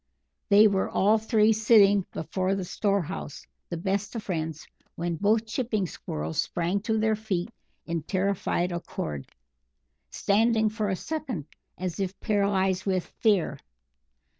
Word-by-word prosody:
They 210 +1 +8
were 195 -2 0
all 210 +3 +3
three 220 0 +3
sitting 205 -3 +5
before 185 +4 -1
the 190 -2 -3
storehouse, 195 -7 -2 0.2
the 170 - -3
best 195 +5 -2
of 225 - -4
friends, 160 -4 -3 0.3
when 170 0 -2
both 215 +5 +2
chipping 220 -2 -1
Squirrels 80 - -3
sprang 175 +3 -1
to 220 +1 0
their 220 0 +2
feet 210 -3 -3 0.3
in 170 -1 -2
terrified 185 0 0
accord, 75 - -5 0.8
standing 220 - +2
for 215 -1 -2
a 190 - +1
second 255 - -4 0.3
as 185 0 -4
if 190 0 -3
paralysed 195 -3 +1
with 185 -3 -2
fear. 195 - +2
200 Hz, 135 wpm, -27 LUFS, 175-215 Hz, 0.8 s, They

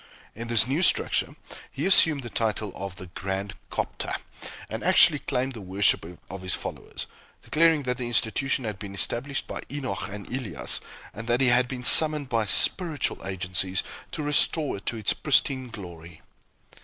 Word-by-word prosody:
In 115 +2 -8
this 115 -2 +5
new 140 +7 -1
structure, - - +1 0.4
he - - -4
assumed 160 -7 +6
the 120 - -7
title 110 -2 -2
of 100 -1 -7
the 95 - -9
"Grand 95 +2 -5 0.2
Cophta" - - -4 0.5
and - - -6
actually - - +5
claimed 130 +2 -2
the 115 - -9
worship 95 -3 0 0.2
of 95 0 -8
his 95 -1 -1
followers; - - -7 0.4
declaring 160 -1 +2
that 125 -1 -2
the 120 - -4
institution 120 +3 0
had 105 -3 -5
been 100 -2 -8
established 120 +8 -3
by - - -7
Enoch 130 -9 -5
and 100 0 -8
Elias, 105 - -1 0.3
and 115 +3 -8
that 120 +1 +1
he 130 -2 +3
had 125 +1 +3
been 125 -1 -7
summoned 150 0 +6
by 115 -2 0
"spiritual" 160 - +3
agencies 90 0 -2 0.3
to 150 - -5
restore 150 -2 +2
it 100 - -15
to 115 - 0
its 110 - 0
pristine 135 -3 0
glory. 85 -6 -11
115 Hz, 165 wpm, -25 LUFS, 95-135 Hz, 0.5 s, assumed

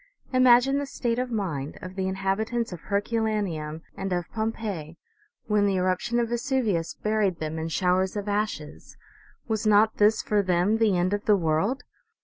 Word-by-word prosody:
Imagine 255 +2 +5
the 285 - -3
state 240 -3 -2
of 250 0 -2
mind 165 - -3
of 185 0 -8
the 190 0 -2
inhabitants 195 +4 -1
of 175 - -7
Herculaneum 200 -7 -2
and 195 0 -4
of 175 -2 -2
Pompeii 215 -8 -4 0.5
when 210 -1 +2
the 195 - +1
eruption 185 +6 0
of 235 -1 0
Vesuvius 235 - -1
buried 210 -4 0
them 160 0 -4
in 160 - -3
showers 185 +3 +1
of 205 0 -4
ashes! 205 -7 -3 0.5
Was 220 -1 -1
not 215 +1 +4
this 210 +1 +4
for 210 -1 +2
them 185 +3 +1
the 210 -5 +3
end 180 +3 +1
of 205 0 -2
the 210 -1 +5
world 175 - 0
205 Hz, 165 wpm, -26 LUFS, 180-225 Hz, 0.5 s, Imagine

